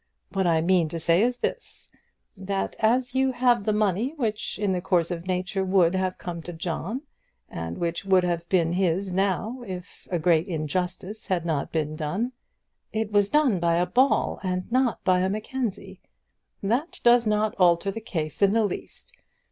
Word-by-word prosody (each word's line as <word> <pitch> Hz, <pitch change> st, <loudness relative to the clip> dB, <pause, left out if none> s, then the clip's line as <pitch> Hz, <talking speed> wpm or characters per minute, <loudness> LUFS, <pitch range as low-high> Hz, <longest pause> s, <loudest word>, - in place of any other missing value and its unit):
What 190 Hz, -2 st, 0 dB
I 165 Hz, -2 st, +3 dB
mean 170 Hz, -1 st, +2 dB
to 165 Hz, -, -4 dB
say 170 Hz, +3 st, +3 dB
is 245 Hz, +2 st, +1 dB
this, -, -, -5 dB, 0.4 s
that 195 Hz, 0 st, -3 dB
as 245 Hz, +3 st, +2 dB
you 265 Hz, 0 st, +2 dB
have 245 Hz, -4 st, +2 dB
the 215 Hz, -, +2 dB
money 210 Hz, -, 0 dB
which 220 Hz, -7 st, -2 dB
in 205 Hz, -1 st, 0 dB
the 180 Hz, -1 st, -1 dB
course 175 Hz, -2 st, +1 dB
of 175 Hz, +1 st, -5 dB
nature 185 Hz, +1 st, -1 dB
would 185 Hz, -2 st, +3 dB
have 185 Hz, -1 st, -1 dB
come 170 Hz, -2 st, -6 dB
to 175 Hz, +2 st, -8 dB
John, 180 Hz, -, -4 dB, 0.5 s
and 80 Hz, 0 st, -5 dB
which 170 Hz, +1 st, -2 dB
would 190 Hz, -2 st, +4 dB
have 170 Hz, -1 st, -2 dB
been 170 Hz, -3 st, +2 dB
his 185 Hz, +1 st, 0 dB
now 200 Hz, +6 st, -1 dB
if 180 Hz, 0 st, -8 dB
a 180 Hz, -, 0 dB
great 165 Hz, +1 st, +2 dB
injustice 180 Hz, +5 st, -3 dB
had 175 Hz, -3 st, 0 dB
not 155 Hz, -4 st, -1 dB
been 155 Hz, -1 st, -1 dB
done 185 Hz, +11 st, -2 dB, 0.3 s
" -, -, -53 dB
"It 220 Hz, -1 st, -2 dB
was 205 Hz, -1 st, +3 dB
done 275 Hz, -9 st, +3 dB
by 170 Hz, -1 st, +2 dB
a 175 Hz, +1 st, +2 dB
Ball, 260 Hz, +8 st, +2 dB
and 185 Hz, -1 st, -1 dB
not 255 Hz, -1 st, +1 dB
by 185 Hz, -1 st, +3 dB
a 185 Hz, +1 st, +1 dB
Mackenzie." 215 Hz, +2 st, -4 dB, 0.6 s
"That 245 Hz, -, -1 dB
does 240 Hz, -1 st, +5 dB
not 210 Hz, 0 st, +1 dB
alter 175 Hz, +2 st, +4 dB
the 225 Hz, -, -6 dB
case 160 Hz, -8 st, -4 dB
in 200 Hz, -, +6 dB
the 225 Hz, -1 st, +3 dB
least. 200 Hz, -, -6 dB
190 Hz, 185 wpm, -25 LUFS, 170-220 Hz, 0.6 s, in